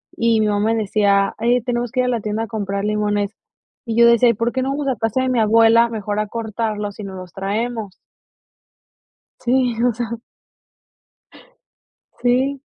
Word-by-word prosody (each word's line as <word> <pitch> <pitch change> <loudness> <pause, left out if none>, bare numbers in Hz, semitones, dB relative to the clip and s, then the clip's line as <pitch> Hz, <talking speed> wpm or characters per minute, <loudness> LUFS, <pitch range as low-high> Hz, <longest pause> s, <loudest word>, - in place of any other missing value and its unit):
y 230 -1 +2
mi 215 - +2
mamá 210 +2 +1
decía: 200 -2 +2
"Eh, 240 +2 +2
tenemos 240 0 -2
que 255 - +1
ir - - 0
a - - 0
la 235 -3 -1
tienda 215 +2 -2
a - - -5
comprar 200 -2 -3
limones", 210 -1 0 0.5
y 230 -2 -3
yo 235 - +7
decía: 235 +1 +5
"¿Y - - +3
por 230 +3 -1
qué 260 - -2
no 265 - -1
vamos 285 0 -3
a 265 - +1
casa 225 +4 0
de 260 - 0
mi 250 -2 +1
abuela 225 +2 +5
mejor 210 -2 -3
a 215 - -1
cortarlos 215 -2 -4
y - - -5
nos 195 -1 -7
los 185 -1 -10
traemos?". 210 +1 -3 1.4
Sí, 250 -1 +1
o 245 - +2
sea. 235 0 -4 2.0
Sí. 260 +3 +1
225 Hz, 180 wpm, -20 LUFS, 210-240 Hz, 2.0 s, yo